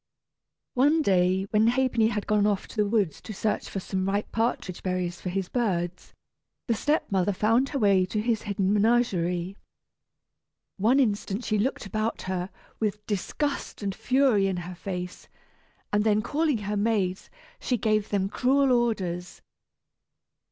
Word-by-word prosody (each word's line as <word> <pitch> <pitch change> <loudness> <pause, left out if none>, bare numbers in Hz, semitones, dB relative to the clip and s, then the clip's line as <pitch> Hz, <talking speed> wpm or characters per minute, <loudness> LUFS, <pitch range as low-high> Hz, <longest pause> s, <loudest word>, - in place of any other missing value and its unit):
One 295 +5 +3
day 185 -2 +3
when 215 +1 +4
Ha'penny 245 -2 +2
had 210 -2 -2
gone 210 -1 +2
off 200 -2 -1
to - - -11
the 210 -2 +2
woods 200 -7 0
to 215 - -8
search 210 +1 -1
for 195 - -3
some 190 0 -2
ripe 200 +1 -1
partridge 225 -5 -1
berries 180 -2 -2
for 180 - -3
his 190 0 -2
birds, 180 -7 -2 0.5
the 235 - +1
step 295 +6 0
mother 190 +1 +2
found 225 +7 +2
her 280 - -2
way 195 -6 +3
to 210 - -2
his 225 0 0
hidden 200 -2 0
menagerie. 195 -5 +1 1.2
One 230 +8 +3
instant 210 -2 0
she 215 -1 +1
looked 250 +2 -1
about 215 +3 -2
her, 185 0 -3 0.3
with 210 -1 -2
disgust 225 +5 -3
and 195 -1 -1
fury 250 -4 +2
in 190 -2 -1
her 180 - -6
face, 180 0 -6 0.7
and 205 0 +3
then 215 -1 +2
calling 300 -3 +1
her 210 +1 -1
maids 200 -3 0 0.3
she 250 - 0
gave 215 -1 +1
them 195 -2 0
cruel 265 +6 +2
orders. 190 -8 -1
210 Hz, 155 wpm, -26 LUFS, 190-230 Hz, 1.2 s, when